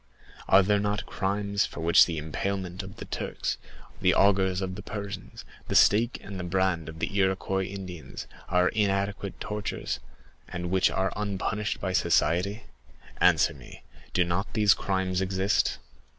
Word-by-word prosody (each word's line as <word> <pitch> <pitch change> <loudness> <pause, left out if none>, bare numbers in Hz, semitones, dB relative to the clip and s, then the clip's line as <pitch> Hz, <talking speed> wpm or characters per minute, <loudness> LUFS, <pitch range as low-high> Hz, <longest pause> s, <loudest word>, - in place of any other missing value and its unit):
Are 95 +1 +7
there 105 +2 +2
not 105 0 -1
crimes 100 0 -1
for - - -8
which 85 +1 +6
the 85 -2 -3
impalement 90 +4 -3
of 95 0 -10
the - - -8
Turks, - - -3 0.4
the - - +4
augers 95 -2 +3
of 95 -1 -3
the 100 - -7
Persians, 100 -3 -7 0.2
the - - -2
stake 115 +4 +4
and 95 -2 -7
the - - -3
brand 90 -2 0
of 80 - -9
the 100 - -3
Iroquois 95 0 +1
Indians, 95 -4 -7 0.2
are 90 0 +3
inadequate 100 -1 -1
tortures, 105 -1 -3 0.5
and 90 -1 -4
which 95 -1 +4
are 95 +1 0
unpunished 105 0 -2
by 95 -1 -2
society? 100 +5 +2 0.6
Answer - - +5
me, - - -13 0.3
do 90 - +3
not 85 +4 -2
these 105 -2 +6
crimes 95 -1 -1
exist?" 95 -4 +1
95 Hz, 150 wpm, -27 LUFS, 90-100 Hz, 0.6 s, Are